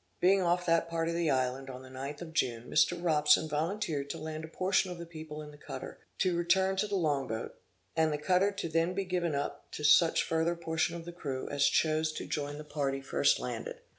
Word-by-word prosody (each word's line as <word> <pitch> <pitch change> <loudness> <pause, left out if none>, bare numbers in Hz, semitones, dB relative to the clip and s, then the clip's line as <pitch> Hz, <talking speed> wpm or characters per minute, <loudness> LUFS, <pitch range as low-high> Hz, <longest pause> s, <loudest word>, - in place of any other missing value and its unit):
Being 190 +2 +4
off 175 0 +1
that 165 0 +2
part 165 0 -1
of - - -1
the 170 -1 +1
island 130 0 0
on 130 0 -8
the 130 - -12
ninth 140 +5 -6
of 160 -1 -10
June, 120 -7 0
Mr. 165 +3 +3
Robson 155 -2 +4
volunteered 155 -2 -2
to - - -4
land 155 0 -5
a - - -6
portion 185 +3 +1
of 180 - -6
the 170 - -7
people 155 -2 -8
in 150 - -10
the 145 - -15
cutter, - - -8 0.2
to 185 -2 +2
return 190 +3 +2
to 210 +2 +1
the 205 - -2
long 145 -7 +1
boat, 110 0 -4 0.4
and 160 -1 +3
the 150 - 0
cutter 180 +6 +3
to 195 -4 -4
be 160 - -11
then 165 +2 +2
given 180 -5 -1
up 145 0 -4
to 150 - -5
such 155 +3 +5
further 165 +1 0
portion 165 0 -1
of 165 -1 -7
the 175 - -7
crew 135 -6 -4
as 145 0 +3
chose 155 +1 +2
to - - -5
join 145 -1 -3
the 150 - -7
party 140 -2 -2
first 135 - +2
landed. 485 +1 -5
160 Hz, 230 wpm, -31 LUFS, 145-175 Hz, 0.4 s, such